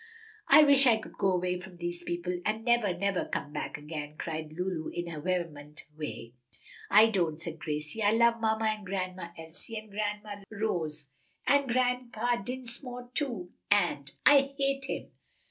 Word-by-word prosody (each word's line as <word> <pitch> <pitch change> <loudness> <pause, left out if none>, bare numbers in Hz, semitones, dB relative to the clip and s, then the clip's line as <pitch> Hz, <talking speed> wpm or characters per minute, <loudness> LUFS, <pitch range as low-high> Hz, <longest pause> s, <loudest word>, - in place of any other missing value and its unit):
"I 305 - +9
wish 280 -2 +7
we 230 -2 +6
could 220 - -10
go 195 - +3
away 180 0 0
from 180 -1 -11
these 175 0 -3
people 175 +1 -3
and 220 +2 -1
never, 235 -7 +3
never 195 0 0
come 145 - -4
back 150 - -3
again!" 150 0 -6
cried 155 -1 -4
Lulu 175 -1 -3
in 175 - -4
her 165 -3 -6
vehement 155 -4 -3
way. 150 -6 -6 0.6
"I 210 +2 +8
don't," 170 -6 0
said 160 -1 -6
Gracie. 150 +7 -3
"I 205 - +5
love 235 0 +4
mamma 220 0 +1
and 215 -1 0
Grandma 185 -2 -3
Elsie, 165 +7 -6
and 215 -1 -8
Grandma 210 0 -3
Rose, 170 -9 -2 0.4
and 280 -1 +4
Grandpa 245 -1 +1
Dinsmore, 245 +2 -5
too, 235 -12 -2 0.2
and 175 -8 +2
" - - -42
"I 275 -1 +6
hate 275 -1 +1
him! - - -5
195 Hz, 165 wpm, -30 LUFS, 170-235 Hz, 0.6 s, I